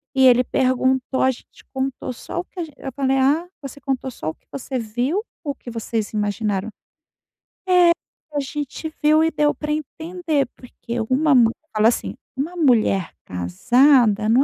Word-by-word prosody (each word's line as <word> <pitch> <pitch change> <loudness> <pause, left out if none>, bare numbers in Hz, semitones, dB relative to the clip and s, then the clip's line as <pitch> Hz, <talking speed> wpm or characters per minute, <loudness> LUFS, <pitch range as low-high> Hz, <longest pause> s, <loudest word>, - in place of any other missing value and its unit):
e 265 0 +5
ele 250 0 +6
perguntou, 260 +1 +1
a 260 - +4
gente 240 - -15
contou 265 -1 -3
só 295 - -6
o 350 - -4
que 375 - -12
a - - -1
gen" 310 -3 -10
eu 270 - -6
falei: 270 -1 +1
"Ah, 285 +6 +3 0.2
você 280 0 -9
contou 265 -1 -2
só 195 -10 -5
o - - -6
que - - -43
você 265 -1 -4
viu 245 - -1 0.2
ou 285 - -2
que 255 - -11
vocês 225 -2 -3
imaginaram?" 205 -1 -1 1.0
"É, 355 -2 +6 0.4
a 290 - 0
gente 295 +3 -5
viu 310 +1 +5
e 325 - +3
deu 295 0 +2
pra 300 0 -4
entender, 310 -1 -2
porque 235 -1 -7
uma 280 +2 +3
mu" 230 -2 +6 0.2
falou 215 +1 +5
assim: 235 - 0 0.2
"Uma 310 +7 -3
mulher 225 - +2
casada 215 - +3
não 245 +5 +5
265 Hz, 175 wpm, -22 LUFS, 235-295 Hz, 1.0 s, ele